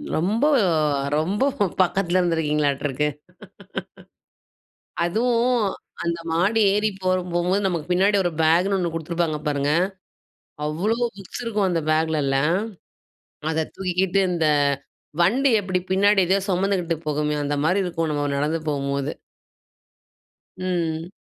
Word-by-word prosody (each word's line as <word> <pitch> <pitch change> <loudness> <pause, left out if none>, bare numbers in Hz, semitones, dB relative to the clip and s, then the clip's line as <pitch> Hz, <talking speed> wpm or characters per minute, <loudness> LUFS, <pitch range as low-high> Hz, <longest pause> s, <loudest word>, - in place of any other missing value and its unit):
ரொம்ப 210 - +1 0.7
ரொம்ப 185 +8 -1 0.4
பக்கத்ல 185 0 +1
இருந்துருக்கீங்களாட்ருக்கு. 150 -4 0 2.0
அதுவும் 240 +6 +2 0.5
அந்த 170 0 -1
மாடி 190 +7 +2
ஏறி 210 +1 +2
போக 185 0 +2 0.2
போகும்போது 180 +4 +1
நமக்கு 170 -5 -2
பின்னாடி 195 +3 +3
ஒரு 175 - +1
பேக்னு 175 +5 +3
ஒண்ணு 175 -2 -1
குடுத்துருப்பாங்க 165 -1 -1
பாருங்க. 145 0 +1 0.9
அவ்ளோ 175 +10 0 0.2
புக்ஸ் 195 +4 -8
இருக்கும் 210 -4 0
அந்த 170 -2 0
பேக்லலாம். 155 0 +1 0.9
அத 160 0 0
தூக்கிக்கிட்டு 190 +1 0
இந்த 165 -3 +1 0.7
வண்டி 255 +11 +3
எப்டி 185 -2 -1
பின்னாடி 200 +1 +4
ஏதோ 190 - +4
சொமந்துகிட்டு 180 -3 0
போகுமே, 150 0 0
அந்த 145 +1 -1
மாரி 185 +5 +2
இருக்கும் 165 -2 -2
நம்ம 145 -1 -1
நடந்து 150 +3 0
போகும்போது. 140 -1 -1 1.5
ம். 170 -2 -2
175 Hz, 105 wpm, -23 LUFS, 155-195 Hz, 2.0 s, பின்னாடி